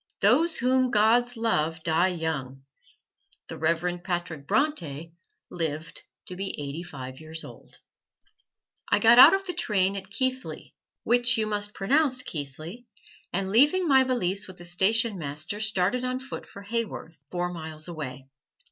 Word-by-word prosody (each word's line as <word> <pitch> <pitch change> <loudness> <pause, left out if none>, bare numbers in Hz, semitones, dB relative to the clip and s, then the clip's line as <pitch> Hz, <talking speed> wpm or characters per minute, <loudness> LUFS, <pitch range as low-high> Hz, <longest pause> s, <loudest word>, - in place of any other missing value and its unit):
Those 300 +11 +3
whom 255 0 +2
the - - -1
gods 235 +3 +3
love 160 -8 0
die 165 +2 +3
young: 155 -7 -4 0.9
the - - -6
Reverend 170 +2 0
Patrick 175 -6 -4
Bronte 165 - -1 0.4
lived 160 -1 -4 0.2
to 180 - -5
be 195 -2 -4
eighty 145 +3 -5
five 130 -7 -9
years 160 +1 -7
old. - - -13 1.1
I - - +5
got 235 +1 +6
out 295 +8 +10
of 390 0 -4
the 360 - -3
train 200 - 0
at 195 0 -6
Keighley, 260 +4 -4 0.3
which 245 +1 +4
you 220 - +1
must 210 0 -2
pronounce 260 +4 +2
"Keethley," 155 - -7 0.4
and 190 +1 -2
leaving 295 - +4
my 265 -3 +6
valise 200 -7 -1
with 185 -1 -12
the 175 - -9
station 200 +4 +2
master 155 +7 -4
started 210 +3 +1
on 255 0 -2
foot 270 +1 -8
for 200 - -12
Haworth, 200 -9 -5
four 180 0 -2
miles 160 -1 -6
away. 135 -6 -7
190 Hz, 150 wpm, -26 LUFS, 160-245 Hz, 1.1 s, out